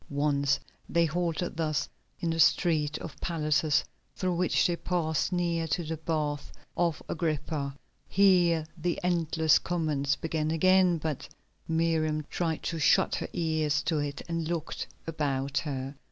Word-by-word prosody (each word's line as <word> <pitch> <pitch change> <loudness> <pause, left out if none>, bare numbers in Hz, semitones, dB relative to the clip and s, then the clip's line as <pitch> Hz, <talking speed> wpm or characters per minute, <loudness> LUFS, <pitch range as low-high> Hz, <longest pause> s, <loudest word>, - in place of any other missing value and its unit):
Once 140 -1 +1 0.3
they 170 0 +3
halted 170 +1 -1
thus 155 -3 0 0.3
in 165 - -1
the 165 - -2
street 155 -2 +3
of 145 -4 -9
palaces 155 -3 +1 0.3
through 185 -1 0
which 180 +1 +2
they 175 - +2
passed 170 -3 -1
near 170 -2 0
to 160 +3 -1
the 160 +1 -3
Baths 155 -2 -2 0.2
of 170 -3 0
Agrippa. 150 -3 -2 0.3
Here 175 -5 +4
the 175 0 -2
endless 160 -3 +3
comments 150 -5 0
began 155 -1 -2
again, 185 +2 +4
but 155 -3 -4 0.4
Miriam 160 -2 +1
tried 165 -3 -1
to 165 -1 -2
shut - - +4
her - - -4
ears 155 -3 0
to 160 -3 0
it 145 -1 -3
and 165 -1 -2
looked 165 -2 -3 0.2
about 140 -3 -1
her. 135 -3 -4
160 Hz, 140 wpm, -29 LUFS, 150-170 Hz, 0.4 s, Here